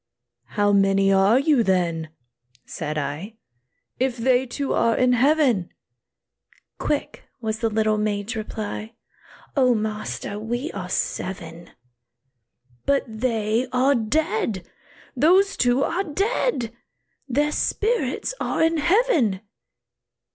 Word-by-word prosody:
"How 205 Hz, 0 st, +3 dB
many 195 Hz, 0 st, +3 dB
are 195 Hz, +5 st, +5 dB
you, 280 Hz, -2 st, +3 dB
then," 170 Hz, -5 st, 0 dB, 0.6 s
said 155 Hz, -1 st, -5 dB
I, 150 Hz, +9 st, -4 dB, 0.6 s
"If 255 Hz, -1 st, 0 dB
they 255 Hz, +2 st, +2 dB
two 275 Hz, +3 st, -2 dB
are 230 Hz, -1 st, +2 dB
in 250 Hz, 0 st, +3 dB
heaven?" 255 Hz, -, +3 dB, 1.1 s
Quick 295 Hz, -, -2 dB
was 220 Hz, -2 st, -3 dB
the 230 Hz, -1 st, +1 dB
little 215 Hz, 0 st, +1 dB
maid's 210 Hz, +2 st, -2 dB
reply, 215 Hz, +1 st, -5 dB, 0.6 s
"O 255 Hz, -3 st, +4 dB
master! 215 Hz, -1 st, -4 dB
we 240 Hz, +7 st, -3 dB
are 180 Hz, -2 st, -6 dB
seven." 170 Hz, -3 st, -4 dB, 1.2 s
"But 280 Hz, 0 st, +3 dB
they 225 Hz, +1 st, -1 dB
are 260 Hz, +2 st, +3 dB
dead; 220 Hz, -, -1 dB, 0.5 s
those 365 Hz, +9 st, +4 dB
two 245 Hz, +2 st, +2 dB
are 355 Hz, +6 st, 0 dB
dead! 380 Hz, -, -1 dB, 0.5 s
Their 290 Hz, +4 st, +1 dB
spirits 420 Hz, -, -1 dB
are -, -, 0 dB
in 325 Hz, 0 st, +2 dB
heaven!" 315 Hz, -, +2 dB
230 Hz, 110 wpm, -23 LUFS, 205-280 Hz, 1.2 s, are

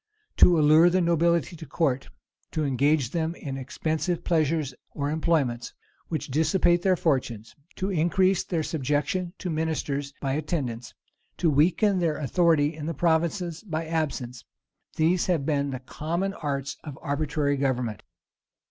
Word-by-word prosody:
To 175 Hz, -2 st, +7 dB
allure 155 Hz, +3 st, +6 dB
the 185 Hz, +1 st, +2 dB
nobility 170 Hz, 0 st, +2 dB
to 160 Hz, -, -9 dB
court; 135 Hz, -2 st, -1 dB, 0.4 s
to 155 Hz, -1 st, 0 dB
engage 140 Hz, 0 st, +2 dB
them 165 Hz, 0 st, -1 dB
in 135 Hz, -5 st, -6 dB
expensive 155 Hz, +6 st, -2 dB
pleasures 155 Hz, -4 st, +1 dB, 0.2 s
or 145 Hz, 0 st, -3 dB
employments 150 Hz, -7 st, 0 dB, 0.3 s
which 155 Hz, -4 st, -4 dB
dissipate 175 Hz, +3 st, +3 dB
their 185 Hz, 0 st, +3 dB
fortune; 130 Hz, -10 st, 0 dB, 0.3 s
to 190 Hz, +1 st, -2 dB
increase 185 Hz, +2 st, +2 dB
their 165 Hz, -3 st, -2 dB
subjection 155 Hz, +5 st, -1 dB
to 180 Hz, -, -4 dB
ministers 150 Hz, -3 st, -2 dB
by 135 Hz, -1 st, -1 dB
attendance; 135 Hz, -6 st, -3 dB, 0.4 s
to 165 Hz, -, +2 dB
weaken 185 Hz, +7 st, +3 dB
their 165 Hz, -3 st, 0 dB
authority 155 Hz, 0 st, +2 dB
in 155 Hz, -1 st, -6 dB
the 165 Hz, -, -3 dB
provinces 170 Hz, +2 st, 0 dB
by 165 Hz, -5 st, -3 dB
absence: 145 Hz, -7 st, -3 dB, 0.5 s
these 165 Hz, +3 st, +2 dB
have 165 Hz, -7 st, +1 dB
been 140 Hz, -2 st, 0 dB
the 130 Hz, -, -3 dB
common 170 Hz, +9 st, -3 dB
arts 140 Hz, -5 st, -3 dB
of 145 Hz, -4 st, -8 dB
arbitrary 145 Hz, -1 st, 0 dB
government. 125 Hz, -6 st, -1 dB
155 Hz, 140 wpm, -26 LUFS, 140-170 Hz, 0.5 s, To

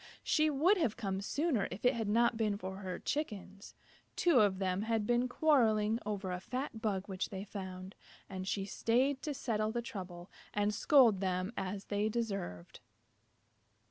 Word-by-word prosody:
She 310 Hz, 0 st, +3 dB
would 320 Hz, +8 st, +3 dB
have 265 Hz, -10 st, 0 dB
come 195 Hz, -4 st, -2 dB
sooner 280 Hz, -, 0 dB
if 190 Hz, +7 st, -7 dB
it 250 Hz, -, +5 dB
had 225 Hz, -2 st, -2 dB
not 235 Hz, +2 st, +3 dB
been 215 Hz, -2 st, 0 dB
for 190 Hz, -1 st, -6 dB
her 190 Hz, -2 st, -5 dB
Chickens. 200 Hz, -9 st, -4 dB, 0.4 s
Two 335 Hz, -8 st, +4 dB
of 200 Hz, -3 st, +3 dB
them 190 Hz, 0 st, 0 dB
had 225 Hz, -1 st, 0 dB
been 240 Hz, +2 st, +2 dB
quarrelling 225 Hz, -7 st, +3 dB
over 200 Hz, -3 st, -3 dB
a 180 Hz, -, -3 dB
fat 250 Hz, +3 st, -5 dB
bug 200 Hz, -4 st, -1 dB
which 190 Hz, -2 st, -3 dB
they 190 Hz, -1 st, -5 dB
found, 190 Hz, -2 st, -7 dB, 0.3 s
and 190 Hz, -1 st, -6 dB
she 195 Hz, 0 st, -1 dB
stayed 255 Hz, +7 st, +1 dB
to 295 Hz, -2 st, -3 dB
settle 215 Hz, -5 st, -1 dB
the 240 Hz, +1 st, -2 dB
trouble 180 Hz, -5 st, -8 dB, 0.2 s
and 205 Hz, 0 st, +1 dB
scold 230 Hz, -4 st, +5 dB
them 185 Hz, +2 st, -1 dB
as 195 Hz, +1 st, -4 dB
they 205 Hz, +1 st, 0 dB
deserved. 195 Hz, -, -4 dB
210 Hz, 170 wpm, -34 LUFS, 190-240 Hz, 0.4 s, it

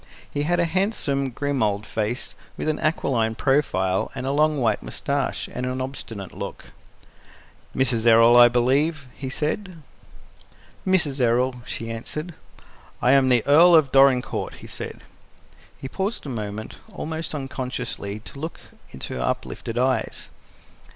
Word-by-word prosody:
He 145 Hz, -, -2 dB
had 175 Hz, +4 st, +1 dB
a 170 Hz, -, +3 dB
handsome, 165 Hz, -7 st, 0 dB
grim 145 Hz, +2 st, -2 dB
old 105 Hz, -1 st, 0 dB
face, 110 Hz, +3 st, -3 dB, 0.2 s
with -, -, -3 dB
an 155 Hz, -1 st, 0 dB
aquiline 120 Hz, -8 st, 0 dB
profile, 95 Hz, -10 st, +1 dB
a -, -, -4 dB
long 150 Hz, +1 st, +2 dB
white 110 Hz, -4 st, +1 dB
mustache, 140 Hz, -1 st, -2 dB
and -, -, -4 dB
an 130 Hz, +1 st, -2 dB
obstinate 115 Hz, -7 st, -6 dB
look. -, -, -7 dB, 1.0 s
"Mrs. 120 Hz, -3 st, +2 dB
Errol, 115 Hz, +1 st, +7 dB
I 120 Hz, 0 st, +9 dB
believe?" 135 Hz, +5 st, +1 dB
he 135 Hz, -, -6 dB
said. 160 Hz, +4 st, -3 dB, 1.0 s
"Mrs. 160 Hz, -7 st, +2 dB
Errol," 125 Hz, +2 st, +2 dB
she 115 Hz, 0 st, -5 dB
answered. 150 Hz, +9 st, -6 dB, 0.7 s
"I 125 Hz, -, +3 dB
am 135 Hz, -1 st, +5 dB
the 120 Hz, -3 st, +3 dB
Earl 170 Hz, +5 st, +7 dB
of 150 Hz, -5 st, +4 dB
Dorincourt," 135 Hz, -2 st, +3 dB
he -, -, -12 dB
said. -, -, -7 dB, 0.8 s
He -, -, -7 dB
paused 195 Hz, -, -3 dB
a -, -, -5 dB
moment, 110 Hz, -3 st, -5 dB
almost 160 Hz, 0 st, -4 dB
unconsciously, 125 Hz, -6 st, -4 dB
to 135 Hz, -, -11 dB
look 160 Hz, +3 st, -5 dB, 0.3 s
into 65 Hz, -, -6 dB
her 60 Hz, -, -3 dB
uplifted 115 Hz, -, -3 dB
eyes. 125 Hz, -2 st, 0 dB
130 Hz, 140 wpm, -24 LUFS, 115-150 Hz, 1.0 s, I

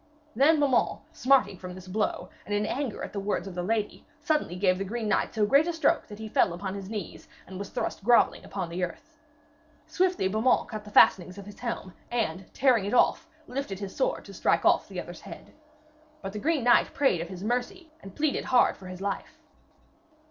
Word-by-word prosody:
Then 295 Hz, +6 st, +5 dB
Beaumains, 275 Hz, -4 st, +2 dB
smarting 260 Hz, -, +2 dB
with 180 Hz, -1 st, -7 dB
this 185 Hz, 0 st, -11 dB
blow, 210 Hz, +3 st, -2 dB, 0.2 s
and 205 Hz, -, -1 dB
in 205 Hz, +1 st, 0 dB
anger 260 Hz, -1 st, -3 dB
at -, -, -6 dB
the 200 Hz, -, -2 dB
words 200 Hz, 0 st, -2 dB
of 190 Hz, -, -7 dB
the 180 Hz, -, -3 dB
lady, 210 Hz, +3 st, -2 dB, 0.2 s
suddenly 305 Hz, -, 0 dB
gave 185 Hz, 0 st, +2 dB
the -, -, -1 dB
green 220 Hz, +3 st, -3 dB
knight 210 Hz, -, 0 dB
so 215 Hz, -1 st, +3 dB
great 280 Hz, +9 st, +4 dB
a 345 Hz, -, -1 dB
stroke 325 Hz, -3 st, +1 dB
that 210 Hz, -, -10 dB
he 220 Hz, 0 st, -7 dB
fell 210 Hz, -, +2 dB
upon 190 Hz, +2 st, -5 dB
his 195 Hz, -1 st, -7 dB
knees, 210 Hz, -6 st, -6 dB, 0.2 s
and 190 Hz, -, -12 dB
then 185 Hz, -, -6 dB
was 200 Hz, -, -6 dB
thrust -, -, -4 dB
grovelling 240 Hz, +2 st, +4 dB
upon 190 Hz, -4 st, -5 dB
the 175 Hz, +2 st, -3 dB
earth. 290 Hz, -, -7 dB, 0.7 s
Swiftly 365 Hz, -, +1 dB
Beaumains 220 Hz, +6 st, +2 dB
cut 215 Hz, -2 st, -6 dB
the -, -, -9 dB
fastenings 185 Hz, -2 st, +5 dB
of 200 Hz, -, -9 dB
his 205 Hz, 0 st, -12 dB
helm, 235 Hz, -6 st, -4 dB, 0.2 s
and, 195 Hz, -6 st, -2 dB
tearing 250 Hz, -7 st, +3 dB
it 205 Hz, -, -1 dB
off, -, -, +3 dB, 0.2 s
lifted 250 Hz, -7 st, -4 dB
his 195 Hz, -1 st, -7 dB
sword -, -, -1 dB
to -, -, -11 dB
strike -, -, +1 dB
off -, -, +4 dB
the -, -, -6 dB
other's -, -, -8 dB
head. -, -, -11 dB, 0.7 s
But 195 Hz, -, -5 dB
the 210 Hz, -, -4 dB
green 305 Hz, +1 st, 0 dB
knight 240 Hz, 0 st, +4 dB
prayed 270 Hz, -, +2 dB
of 170 Hz, -, -6 dB
his 185 Hz, 0 st, -8 dB
mercy 305 Hz, -, -3 dB
and 195 Hz, -1 st, -11 dB
pleaded 300 Hz, -1 st, 0 dB
hard 250 Hz, -1 st, +3 dB
for 185 Hz, -, -11 dB
his 185 Hz, 0 st, -8 dB
life. 200 Hz, 0 st, -4 dB
210 Hz, 215 wpm, -27 LUFS, 190-260 Hz, 0.7 s, Then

